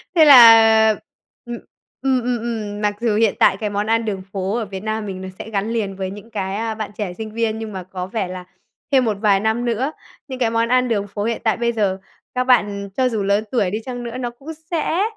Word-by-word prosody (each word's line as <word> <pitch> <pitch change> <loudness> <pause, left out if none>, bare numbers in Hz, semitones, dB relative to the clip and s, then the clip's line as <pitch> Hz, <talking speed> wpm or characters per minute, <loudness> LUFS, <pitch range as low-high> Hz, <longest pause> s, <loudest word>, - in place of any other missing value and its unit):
thế 320 -2 +7
là 225 -5 +8 0.6
ừm, 240 0 -6 0.4
ừm, 265 -1 +1
ừm, 245 0 0
ừm, 220 -3 -4
mặc 205 -1 0
dù 230 -3 +1
hiện 220 -1 +2
tại 190 - +4
cái 210 0 -3
món 205 +1 -2
ăn 225 0 +1
đường 200 -3 -3
phố 195 +2 -2
ở 230 - -2
Việt 190 -1 -8
Nam 215 0 -3
mình 190 -2 -6
nó 190 - -6
sẽ - - -7
gắn 205 0 -2
liền 210 -4 -2
với 190 -1 -4
những 205 +3 -11
cái, 195 -2 -3
a, 220 +1 -3
bạn 215 -1 -5
trẻ 200 -4 -3
sinh 215 +3 -7
viên, 220 -1 -1
nhưng 220 -1 -6
mà 190 -1 -5
có 185 0 -6
vẻ 195 -1 -3
là 180 0 -7 0.5
thêm 265 -2 +4
một 215 -3 -1
vài 205 -3 +4
năm 220 +3 0
nữa, 245 +5 -1 0.4
những 260 -2 -7
cái 240 -3 +2
món 230 0 0
ăn 255 0 +3
đường 205 -4 -1
phố 205 +1 -5
hiện 230 +1 -2
tại 220 -3 +1
bây 235 0 0
giờ, 205 -5 0 0.4
các 250 - +1
bạn 205 -6 +1
cho 260 -1 +2
dù 220 -4 -2
lớn 200 +2 +1
tuổi 225 -7 +1
đi 210 - -1
chăng 245 -1 -5
nữa 235 +1 -6
nó 245 -1 -3
cũng 255 +6 -13 0.2
sẽ 335 +2 0
220 Hz, 250 wpm, -20 LUFS, 200-235 Hz, 0.6 s, là